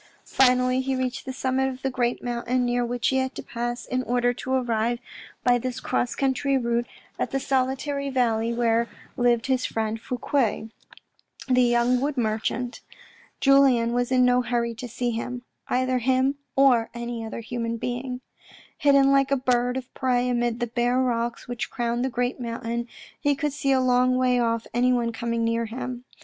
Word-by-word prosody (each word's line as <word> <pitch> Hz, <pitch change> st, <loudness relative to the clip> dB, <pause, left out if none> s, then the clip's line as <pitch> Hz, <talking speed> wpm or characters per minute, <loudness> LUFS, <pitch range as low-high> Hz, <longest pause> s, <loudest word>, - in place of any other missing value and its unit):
Finally, 255 Hz, 0 st, +3 dB
he 265 Hz, 0 st, -1 dB
reached 255 Hz, 0 st, -3 dB
the -, -, -2 dB
summit 265 Hz, 0 st, 0 dB
of 260 Hz, 0 st, -8 dB
the 270 Hz, -, 0 dB
great 245 Hz, -1 st, -1 dB
mountain, 245 Hz, +1 st, -1 dB
near 245 Hz, 0 st, +1 dB
which 240 Hz, 0 st, 0 dB
he 265 Hz, -, +1 dB
had 260 Hz, 0 st, -1 dB
to -, -, -6 dB
pass 240 Hz, +1 st, -4 dB
in 255 Hz, 0 st, -1 dB
order 245 Hz, 0 st, +1 dB
to 260 Hz, +1 st, -6 dB
arrive 240 Hz, -2 st, +1 dB, 0.5 s
by 245 Hz, -1 st, +4 dB
this 255 Hz, +1 st, -4 dB
cross 245 Hz, -, -1 dB
country 275 Hz, 0 st, +1 dB
route 235 Hz, -1 st, 0 dB, 0.3 s
at -, -, -1 dB
the 270 Hz, -, -1 dB
solitary 270 Hz, +1 st, -1 dB
valley 230 Hz, -3 st, +1 dB
where 235 Hz, 0 st, +1 dB, 0.3 s
lived 240 Hz, -2 st, +2 dB
his 260 Hz, -1 st, +1 dB
friend 220 Hz, 0 st, -2 dB
Fouque, 240 Hz, -3 st, -1 dB, 0.8 s
the 255 Hz, -1 st, +4 dB
young 240 Hz, +1 st, +3 dB
wood 285 Hz, 0 st, -1 dB
merchant. 230 Hz, +2 st, -2 dB, 0.6 s
Julien 270 Hz, -4 st, +4 dB
was 245 Hz, +1 st, 0 dB
in 255 Hz, -1 st, +4 dB
no 250 Hz, 0 st, +4 dB
hurry 235 Hz, -1 st, -1 dB
to 240 Hz, +2 st, -7 dB
see 240 Hz, +1 st, -2 dB
him; 245 Hz, +2 st, -4 dB, 0.2 s
either 255 Hz, 0 st, +1 dB
him, 260 Hz, +2 st, +2 dB, 0.2 s
or 255 Hz, -4 st, +4 dB
any 235 Hz, -1 st, -4 dB
other 225 Hz, +1 st, -6 dB
human 230 Hz, 0 st, -3 dB
being. 250 Hz, +2 st, -4 dB, 0.6 s
Hidden 275 Hz, -1 st, +5 dB
like 275 Hz, -1 st, +3 dB
a 275 Hz, -, +2 dB
bird 250 Hz, -1 st, +1 dB
of 260 Hz, 0 st, -7 dB
prey 250 Hz, -2 st, +1 dB
amid 240 Hz, -1 st, 0 dB
the 240 Hz, -, 0 dB
bare 240 Hz, +1 st, 0 dB
rocks 235 Hz, -2 st, -1 dB
which 245 Hz, -1 st, -4 dB
crowned 240 Hz, 0 st, -1 dB
the 265 Hz, -, 0 dB
great 245 Hz, +1 st, -2 dB
mountain, 235 Hz, 0 st, -3 dB, 0.3 s
he 285 Hz, -1 st, +2 dB
could 295 Hz, 0 st, -2 dB
see 280 Hz, -1 st, 0 dB
a 265 Hz, -, +4 dB
long 255 Hz, 0 st, +3 dB
way 250 Hz, -1 st, +2 dB
off 230 Hz, -1 st, 0 dB
anyone 240 Hz, -1 st, +2 dB
coming 230 Hz, 0 st, -2 dB
near 230 Hz, 0 st, 0 dB
him. 245 Hz, +1 st, -6 dB
245 Hz, 180 wpm, -25 LUFS, 235-260 Hz, 0.8 s, Hidden